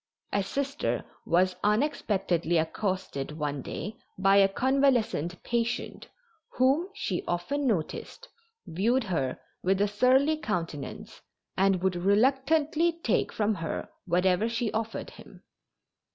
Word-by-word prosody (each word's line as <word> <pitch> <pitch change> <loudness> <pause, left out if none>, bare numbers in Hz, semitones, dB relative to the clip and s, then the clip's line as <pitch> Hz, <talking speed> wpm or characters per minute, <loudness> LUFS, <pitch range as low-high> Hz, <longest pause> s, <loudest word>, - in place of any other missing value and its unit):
A 200 - +2
Sister 275 +8 -2 0.2
was 185 +1 +2
unexpectedly 195 - +1
accosted 160 -4 -2
one 145 -2 -2
day 205 - -6 0.2
by 195 +1 +4
a 195 -1 +7
convalescent 240 - +1
patient, 235 0 -2 0.5
whom, 275 +8 +3
she 190 - -2
often 260 +12 -1
noticed, 225 - -3 0.4
viewed 230 +10 +1
her 160 -10 -2 0.2
with 190 +1 +1
a 205 - +3
surly 260 +8 +3
countenance 165 - -5 0.3
and 190 -1 +2
would 190 -1 +2
reluctantly 280 - +2
take 225 - +1
from 215 0 +1
her 165 -5 -4 0.2
whatever 180 +4 +2
she 230 -1 -1
offered 225 0 -3
him. - - -15
205 Hz, 115 wpm, -28 LUFS, 180-260 Hz, 0.5 s, a